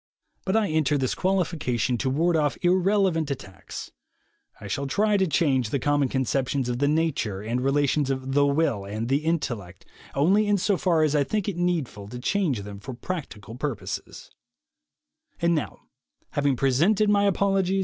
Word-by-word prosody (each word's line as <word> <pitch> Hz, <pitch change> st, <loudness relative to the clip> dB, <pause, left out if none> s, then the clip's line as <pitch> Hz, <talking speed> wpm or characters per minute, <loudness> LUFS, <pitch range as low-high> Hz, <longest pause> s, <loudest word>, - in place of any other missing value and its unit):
But 190 Hz, -, 0 dB
I 215 Hz, -2 st, +2 dB
enter 155 Hz, -2 st, +2 dB
this 130 Hz, -2 st, 0 dB
qualification 165 Hz, -10 st, 0 dB
to 130 Hz, -, 0 dB
ward 165 Hz, +6 st, +2 dB
off 150 Hz, -2 st, +1 dB
irrelevant 185 Hz, -3 st, +2 dB
attacks. 120 Hz, -9 st, -7 dB, 0.7 s
I -, -, -10 dB
shall 135 Hz, +8 st, -2 dB
try 210 Hz, +9 st, +2 dB
to 190 Hz, -2 st, +2 dB
change 135 Hz, -6 st, +1 dB
the 140 Hz, -, 0 dB
common 145 Hz, 0 st, +1 dB
conceptions 130 Hz, +1 st, 0 dB
of 120 Hz, 0 st, -2 dB
the 145 Hz, -, +2 dB
nature 145 Hz, -11 st, 0 dB
and 120 Hz, +3 st, -1 dB
relations 140 Hz, +1 st, +1 dB
of 130 Hz, 0 st, -2 dB
"the 145 Hz, 0 st, +4 dB
will" 140 Hz, -8 st, +1 dB
and 110 Hz, +4 st, -4 dB
"the 135 Hz, -, +3 dB
intellect" 120 Hz, -, -3 dB, 0.3 s
only 195 Hz, +9 st, +3 dB
insofar 185 Hz, -4 st, +2 dB
as 155 Hz, -1 st, +2 dB
I 145 Hz, -, +4 dB
think 210 Hz, +7 st, -2 dB
it 200 Hz, -, -2 dB
needful 160 Hz, -, -1 dB
to 120 Hz, +4 st, -7 dB
change 135 Hz, -, 0 dB
them 100 Hz, 0 st, -8 dB
for 125 Hz, +5 st, -7 dB
practical 120 Hz, -, -6 dB
purposes. 130 Hz, -1 st, -5 dB
140 Hz, 140 wpm, -25 LUFS, 125-170 Hz, 0.7 s, the